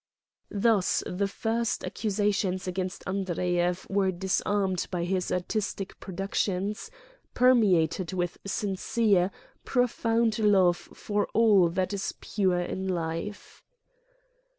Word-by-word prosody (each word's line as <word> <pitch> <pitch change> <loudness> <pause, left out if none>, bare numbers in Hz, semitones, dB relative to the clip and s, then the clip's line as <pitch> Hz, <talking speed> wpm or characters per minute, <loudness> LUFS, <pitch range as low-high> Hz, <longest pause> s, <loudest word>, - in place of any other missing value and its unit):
Thus 205 -2 +2
the 195 +2 -1
first 225 +3 -1
accusations 205 -3 -1
against 185 0 -3
Andreyev 180 -1 -1
were 195 -1 +1
disarmed 190 0 0
by 175 -2 -2
his 180 0 -1
artistic 195 +1 -3
productions, 195 - -2 0.5
per 255 +1 +6
meated 185 -6 +2
with 175 -2 -2
sincere, 200 -1 +1 0.3
profound 230 -3 +1
love 190 -5 +4
for 205 +3 -3
all 210 -6 +5
that 185 +3 -1
i$ 200 - -2 0.2
pure 185 -4 0
in 190 +2 -3
life. 170 +3 -4
195 Hz, 105 wpm, -28 LUFS, 180-210 Hz, 0.5 s, per